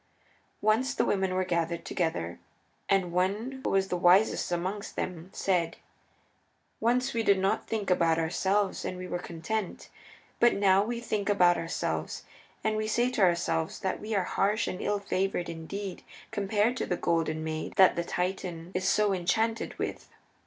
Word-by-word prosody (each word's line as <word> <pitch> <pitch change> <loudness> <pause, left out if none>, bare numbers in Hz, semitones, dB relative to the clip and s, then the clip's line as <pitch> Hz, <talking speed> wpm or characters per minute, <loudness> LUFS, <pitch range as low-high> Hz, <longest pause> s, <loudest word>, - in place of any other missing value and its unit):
Once 230 +6 +2
the 235 - +2
women 190 -3 0
were 185 0 +1
gathered 170 -1 -1
together, 90 - -2 0.5
and 190 -3 +2
one 205 +9 -1
who - - 0
was 195 0 +1
the - - 0
wisest 180 +3 +4
amongst 185 +4 -3
them 175 -1 -4
said: 175 -4 0 1.0
"Once 245 +3 +1
we 230 - +1
did 200 -3 +4
not 190 +1 0
think 210 -4 -2
about 165 -2 +3
ourselves, 190 +5 0
and 185 - -4
we 185 0 -6
were 175 - -3
content. 175 +4 -4 0.5
But 240 - +5
now 195 -1 +4
we 235 +2 -3
think 210 -4 -2
about 180 -4 +5
ourselves, 165 0 -3 0.4
and 220 0 +1
we 215 0 -1
say 240 +3 +1
to 230 - -1
ourselves 170 -3 +1
that 190 - -1
we 215 +1 -3
are 195 - +2
harsh 210 +5 +1
and 180 - -4
ill 205 - 0
favored 190 -3 -1
indeed 180 +4 -6 0.3
compared 210 +4 +1
to - - -2
the 180 - -1
Golden 160 -2 0
Maid 155 0 -4
that 190 -2 +6
the 170 - -1
Titan 180 -1 -3
is 185 +1 -1
so 210 0 +3
enchanted 220 +5 0
with. - - -4
190 Hz, 165 wpm, -29 LUFS, 175-210 Hz, 1.0 s, that